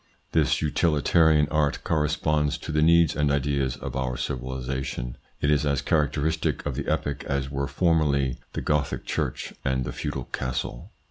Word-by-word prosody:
This - - +2
utilitarian 80 0 +3
art 75 -2 +1
corresponds 75 -1 +1
to - - -6
the 75 0 +2
needs 85 0 +5
and 75 -1 +2
ideas 70 -2 0
of 65 0 -6
our 65 -2 -1
civilisation. 65 -2 -3 0.3
It 70 - +2
is 75 -1 +3
as 70 -3 0
characteristic 75 +1 0
of - - -1
the - - -4
epoch 70 0 -1
as 70 0 -2
were 70 0 -1
formerly 70 -4 +1
the - - -3
Gothic 75 -1 0
church - - -2
and 65 -1 0
the 65 - -4
feudal - - -3
castle. 65 -1 -4
70 Hz, 155 wpm, -26 LUFS, 65-75 Hz, 0.3 s, needs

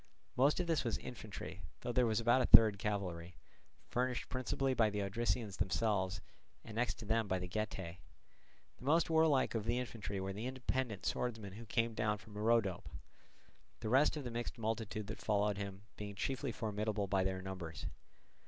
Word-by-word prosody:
Most 140 +6 +4
of 180 - +1
this 165 -2 +1
was 115 -3 0
infantry, 105 -5 -7 0.2
though 120 - -2
there 125 0 +3
was 110 0 +2
about 120 +3 +4
a - - +2
third 110 -3 +9
cavalry, 90 -5 -3 0.5
furnished 125 0 -1
principally 130 +1 0
by 115 -3 +4
the 105 -1 -2
Odrysians 110 +1 -1
themselves 95 -1 0 0.4
and 110 - -8
next 115 -1 +1
to 110 - -9
them 110 0 +1
by 95 - +1
the 90 0 -4
Getae. 95 -3 -3 0.8
The - - -14
most 160 +4 +3
warlike 160 -4 +4
of 110 -2 -1
the 120 +1 +1
infantry 115 -5 -3
were 95 0 -3
the 110 +5 -4
independent 130 -4 -2
swordsmen 110 -5 -2
who 115 +2 -9
came 115 +1 +1
down 105 -1 0
from 105 +1 -15
Rhodope; 105 -4 +1 0.9
the 110 - -2
rest 135 +5 +4
of 145 - -4
the 120 - -4
mixed 120 +1 -4
multitude 110 -1 -2
that 110 +2 -6
followed 105 -1 +1
him 100 -1 -5
being 100 -1 -6
chiefly 130 +6 -2
formidable 105 -2 -1
by 95 -1 +1
their 95 0 -1
numbers. 90 -4 -6
110 Hz, 180 wpm, -36 LUFS, 100-120 Hz, 0.9 s, third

